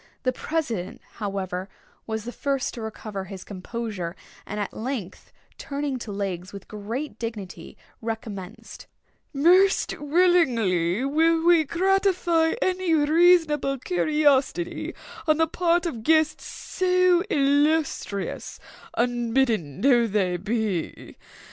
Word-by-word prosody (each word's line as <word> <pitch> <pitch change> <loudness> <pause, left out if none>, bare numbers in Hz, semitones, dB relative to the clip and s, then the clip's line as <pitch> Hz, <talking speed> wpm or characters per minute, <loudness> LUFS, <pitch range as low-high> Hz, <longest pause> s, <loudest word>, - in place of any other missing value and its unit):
The 255 -1 +1
president, 245 - -3 0.2
however, 195 -3 -4 0.4
was 220 -1 -3
the 240 - -4
first 275 0 -2
to 235 - -7
recover 215 -3 -6
his 190 -1 -8
composure, 200 -3 -5 0.3
and 210 - -4
at 205 - -3
length, 225 -6 -5 0.3
turning 280 -3 -3
to 225 - -7
Legs 190 -2 -4
with 200 -1 -10
great 225 +5 -5
dignity, 205 -7 -7 0.2
recommenced: 225 -1 -7 0.4
"Most 360 +7 +4
willingly 255 - +2
will 325 +3 +2
we 340 -2 +5
gratify 360 -2 +2
any 370 -3 +1
reasonable 310 -2 +4
curiosity 300 +1 +1 0.3
on 310 -1 +4
the 325 - +4
part 345 +1 +1
of 245 -10 -3
guests 315 +3 +2
so 365 -1 +2
illustrious, 285 - 0 0.4
unbidden 235 - 0
though 240 -3 +4
they 195 -4 0
be. 205 -3 -3
255 Hz, 110 wpm, -25 LUFS, 205-320 Hz, 0.4 s, we